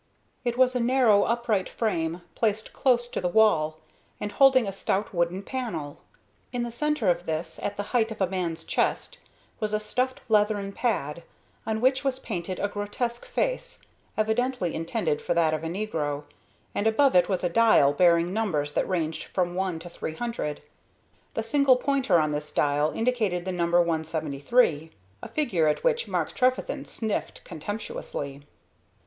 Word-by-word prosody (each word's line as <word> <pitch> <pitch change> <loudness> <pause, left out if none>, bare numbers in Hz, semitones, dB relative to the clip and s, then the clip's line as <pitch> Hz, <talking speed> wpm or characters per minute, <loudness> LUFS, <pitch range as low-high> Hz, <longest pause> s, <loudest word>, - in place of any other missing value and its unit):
It 240 -1 -1
was 255 0 +4
a - - +2
narrow, 235 -4 +4
upright 230 -5 0
frame, 170 -6 -2
placed 220 -1 -1
close 245 -3 +2
to - - -3
the 180 - 0
wall, 175 -7 +3 0.4
and 210 - -4
holding 265 -3 +5
a 195 - -3
stout 195 +2 -1
wooden 175 +2 0
panel. 180 - -4 0.5
In 245 -1 -2
the 240 - -4
centre 300 -3 0
of 175 0 -3
this, 160 +1 -3
at 205 0 -3
the 205 - -2
height 230 -2 +3
of 220 - -7
a 190 - +3
man's 175 -3 -3
chest, - - -1 0.4
was 215 -1 -2
a 210 - +2
stuffed 255 +4 -1
leathern 210 -2 +2
pad, 175 - -1 0.5
on 220 0 -1
which 260 +2 +3
was 270 -2 0
painted 185 -7 -4
a 205 - +1
grotesque 210 +4 -3
face, - - -2 0.4
evidently 220 -3 0
intended 165 -2 -1
for 175 - -1
that 165 -2 +3
of 155 0 -2
a - - -2
negro, 160 -6 -2 0.5
and 205 - 0
above 265 +3 +4
it 180 +1 +5
was 185 -2 -1
a - - +3
dial 170 -9 +5
bearing 170 +2 +4
numbers 155 -10 -1
that - - 0
ranged 165 -4 -1
from 175 -2 -1
1 185 -2 -1
to 165 +2 -9
300. 170 -2 -4 0.7
The 225 - -1
single 275 +2 +4
pointer 255 -7 +2
on 155 -1 +1
this 150 0 -4
dial 145 +1 +2
indicated 215 -7 0
the 190 - -2
number 170 -1 +1
173, 160 - +1 0.3
a - - -6
figure 190 - +1
at 150 - 0
which 485 -1 +1
Mark - - -1
Trefethen 255 0 0
sniffed 220 -2 -4
contemptuously. 155 -6 -6
200 Hz, 165 wpm, -26 LUFS, 165-240 Hz, 0.7 s, holding